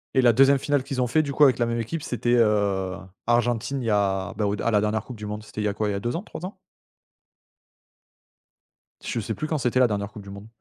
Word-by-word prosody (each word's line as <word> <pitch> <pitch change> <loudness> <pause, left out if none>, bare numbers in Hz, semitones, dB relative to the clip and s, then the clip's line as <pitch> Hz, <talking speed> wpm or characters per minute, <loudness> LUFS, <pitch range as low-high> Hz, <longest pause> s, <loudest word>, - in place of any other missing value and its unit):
Et 130 - +5
la 120 -2 +6
2e 135 +2 +5
finale 145 -1 0
qu'ils 135 -2 -3
ont 125 - +1
fait 155 +6 +2
du 140 -1 -4
coup 150 - +4
avec 130 -4 +6
la 120 - +3
même 115 0 -2
équipe 145 +7 -4
c'était, 120 0 0
heu, 100 -4 +2 0.3
Argentine 120 +3 +1
il - - -5
y - - 0
a 100 -2 0
bah 105 - 0
au 100 +1 0
der 115 - -3
à - - +3
la 105 - +4
dernière 105 +1 0
coupe 125 -3 -9
du 105 - -7
monde. 105 +1 -5
C'était 110 - -7
il - - -2
y - - +2
a 100 - -1
quoi? 105 0 -1
Il - - 0
y 100 - -2
a - - -2
2 120 +7 -3
ans, 170 - -2
3 180 - -8
ans? 195 - -8 2.5
Je - - -3
sais - - -3
plus 155 - -4
quand 155 -1 -1
c'était 125 0 +1
la 125 - +6
dernière 100 -1 -3
Coupe 105 - -10
du 100 - -11
monde. 100 +2 -10
115 Hz, 285 wpm, -25 LUFS, 105-130 Hz, 2.5 s, la